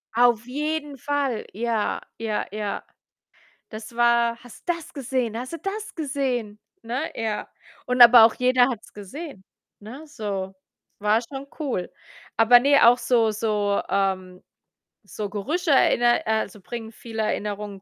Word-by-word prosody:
Auf 240 -1 +4
jeden 295 +2 -3
Fall, 280 -4 -1
ja, 225 0 -1 0.2
ja, 220 -2 -2
ja. 210 -1 -4 0.9
Das 215 +1 -9
war: 235 0 +2
„Hast 245 +8 -15
du 345 - +4
das 335 -2 -11
gesehen? 250 -4 -2
Hast 255 +4 -6
du - - -3
das 410 +4 -5
gesehen?“ 260 -8 -2 0.2
Ne? 250 +7 -3
Ja, 220 -2 -3 0.4
und 250 0 +1
aber 240 -1 +10
auch 225 - +2
jeder 250 0 +3
hat's 230 -4 -7
gesehen, 210 - -9 0.4
ne? 255 +9 -10
So, 200 -8 -5 0.4
war 210 +2 +3
schon 270 +3 -8
cool. 250 - -3 0.5
Aber 235 +2 +7
ne, 280 +2 +4
auch 245 - +6
so 230 -3 +2
so, 210 -2 0
ähm 185 -1 -1 0.6
so 210 -1 -5
Gerüche 300 - -2
erinner 240 -4 +3
äh, - - +1
also 205 +1 -8
bringen 225 +2 -7
viele 225 -1 -5
Erinnerungen 205 -2 -3
235 Hz, 145 wpm, -24 LUFS, 210-265 Hz, 0.9 s, aber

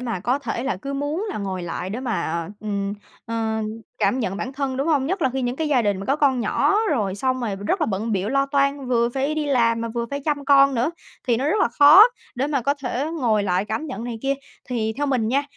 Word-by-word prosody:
mà 230 -7 -3
có 250 +7 0
thể 265 -3 -4
là 265 -8 -1
cứ 275 +9 -6
muốn 295 +9 -2
là - - -4
ngồi 190 -3 -4
lại 175 +2 -4
để 230 - -4
mà, 170 -9 -2
ừm, 200 -1 -2 0.3
ờ, 225 -1 -1 0.4
cảm 260 - +2
nhận 195 -5 -2
bản 255 +5 -4
thân, 270 -1 -2
đúng 275 - -1
hông? 290 -5 +2
Nhất 370 +3 -1
là 265 - +2
khi 265 0 -2
những 245 +1 -2
cái 315 0 -1
gia 260 -5 +3
đình 205 -3 0
mà - - -6
có 275 - +2
con 275 -4 +2
nhỏ 235 - +2
rồi 205 -9 0
xong 255 +5 -1
rồi 215 -5 -2
rất 205 - -1
là 310 - +2
bận 220 +3 -2
bịu 195 +1 -1
lo 275 0 +2
toan, 275 -1 0
vừa 235 -1 +2
phải 270 +4 -1
đi 305 -1 -1
làm 230 -4 +2
mà 230 - -3
vừa 235 +1 -3
phải 280 - -3
chăm 290 -2 -1
con 275 -1 +5
nữa 245 +6 +1 0.4
thì 235 - +4
nó 255 - -2
rất 325 - +2
là - - +3
khó 290 - +8 0.3
để 260 +2 -1
mà 285 -4 -1
có 280 +4 +1
thể 270 -1 -3 0.2
ngồi 220 -5 +2
lại 185 0 0
cảm 220 +9 -3
nhận 255 -5 -6
này 240 -2 -5
kia. 275 0 +1 0.3
Thì 225 -3 -1
theo 290 +1 -1
mình 250 -5 +1
nha, 275 +4 +2
250 Hz, 260 wpm, -23 LUFS, 220-280 Hz, 0.4 s, khó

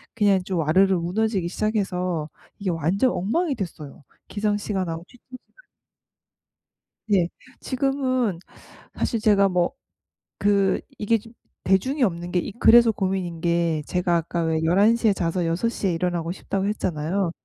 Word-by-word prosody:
그냥 200 -4 +3
좀 185 -1 -3
와르르 185 +5 +3
무너지기 190 +1 -1
시작해서 185 -7 -1 0.3
이게 195 -3 -2
완전 175 - +1
엉망이 280 - 0
됐어요 155 -8 -7 0.2
기상 205 0 -1
시간하고 185 -5 -3
취침 245 - -22
시간이. - - -26 1.5
예. 175 -3 +3 0.3
지금은 255 - -1 0.5
사실 230 - -1
제가 200 -2 +4
뭐 180 +5 +1 0.7
그 200 -2 +3 0.2
이게 220 +1 +1 0.4
대중이 255 +10 +1
없는 175 -4 -1
게 180 +2 -1
그래서 235 0 +7
고민인 185 -5 -2
게 170 -2 +1
제가 180 -1 +1
아까 170 +1 -2
왜 160 -1 0
"11:00 215 +7 +3
에 205 - +5
자서 175 -1 -1
6:00 195 +5 -1
에 175 - +1
일어나고 175 -1 -1
싶다."고 195 +1 -3
했잖아요. 180 -2 -1
190 Hz, 275 characters per minute, -24 LUFS, 170-215 Hz, 1.5 s, 그래서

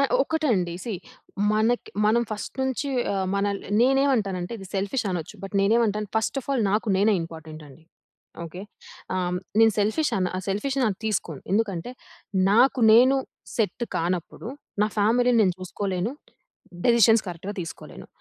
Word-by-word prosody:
ఆహ్, 275 - +2
ఒక్కటండి 235 - 0
సీ 235 - -3 0.6
మనకి 225 +3 +1 0.2
మనం 235 +2 +3
ఫస్ట్ 210 - -5
నుంచి 265 +2 -1 0.3
ఆహ్, 190 -1 -1
మనల్ని 200 0 -2
నేనేమంటానంటే 240 -8 +1
ఇది 195 - -9
సెల్ఫిష్ 200 +5 -1
అనొచ్చు. 170 -4 -4
బట్ 195 +1 -8
నేనేమంటాను 210 0 +2
ఫస్ట్ 220 +5 0
ఆఫ్ 260 - -20
ఆల్ 245 -5 +1
నాకు 215 +1 0
నేనే 210 +2 +3
ఇంపార్టెంట్ 160 -1 -9
అండి. 145 +4 -17 0.6
ఓకె. 175 +3 -8 0.5
ఆహ్, 180 -1 -1 0.2
నేను 225 -1 +6
సెల్ఫిష్ 220 +10 +1
అన 185 - +1 0.2
సెల్ఫిష్‌ 210 +8 -1
అన్న 250 - +3
అది 190 - -14
తీసుకోను. 190 -9 -2
ఎందుకంటే 200 -2 0 0.6
నాకు 250 +4 +4
నేను 255 +4 +6 0.4
సెట్ 225 +1 0
కానప్పుడు, 175 +5 -3 0.3
నా - - +4
ఫ్యామిలీని 240 +3 +3
నేను 185 -3 +2
చూసుకోలేను. 185 +3 -3 0.7
డెసిషన్స్ 230 -2 +5
కరెక్ట్‌‌గా 180 +4 -6
తీసుకోలేను. 165 - -9
210 Hz, 140 wpm, -25 LUFS, 185-235 Hz, 0.7 s, నేను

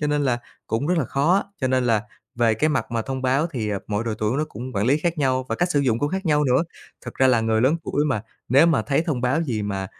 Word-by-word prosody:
cho 150 - 0
nên 145 0 +1
là 125 -3 +1 0.3
cũng 115 +6 -1
rất - - -1
rất 180 - +2
là 145 - +1
khó 140 +9 +1
á, - - +1 0.2
cho 130 - +1
nên 130 -1 +1
là 110 -2 +2 0.3
về 115 -2 +2
cái 155 +8 +1
mặt 150 - -1
mà 115 -1 -1
thông 130 +1 -5
báo 135 +5 +2
thì, 115 -10 -3
à, 100 - -1
mỗi 105 +2 -2
độ 110 -2 -2
tuổi 110 +5 0
nó 155 - +1
cũng 125 +4 -7
quản 100 +3 0
lý 140 +4 +3
khác 170 0 -1
nhau 130 -2 +1
và - - -1
cách 175 0 0
sử 145 - +2
dụng 120 -4 +1
cũng 145 - 0
khác 190 +1 -3
nhau 150 -1 +3
nữa. 130 +4 +3 0.4
Thật - - -7
ra 130 - +3
là 120 -3 +4
người 110 0 +1
lớn 140 +7 +3
tuổi 145 +2 0
mà 110 -7 -1 0.3
nếu 140 +7 +6
mà 165 - +2
thấy 145 +3 +1
thông 140 -6 -1
báo 130 +7 +1
gì 115 -8 -2
mà 100 -2 -3
130 Hz, 305 wpm, -23 LUFS, 115-150 Hz, 0.4 s, nếu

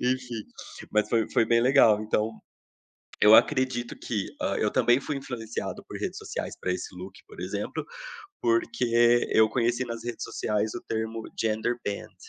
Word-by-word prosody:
Enfim, 125 -3 -1 0.5
mas 105 0 +2
foi 115 -2 +1
foi - - +4
bem 115 +1 +4
legal. 120 -4 +5
Então, 110 0 0 0.9
eu 105 +1 +9
acredito 120 -1 +2
que, 105 -5 -3
hã, - - 0
eu - - +1
também 120 +2 +4
fui 145 +1 -4
influenciado 120 -4 -5
por - - -7
redes - - -3
sociais - - -5
para 90 - -1
esse 90 +1 -6
look, 90 +2 -8
por 425 - -13
exemplo, - - -4 0.6
porque 120 - +3
eu 110 0 +5
conheci 120 +2 0
nas 115 -2 -6
redes 120 -1 -4
sociais 105 0 -1
o 120 - -6
termo 110 0 -3 0.2
Genderbend. 110 -1 -2
115 Hz, 155 wpm, -27 LUFS, 110-125 Hz, 0.9 s, eu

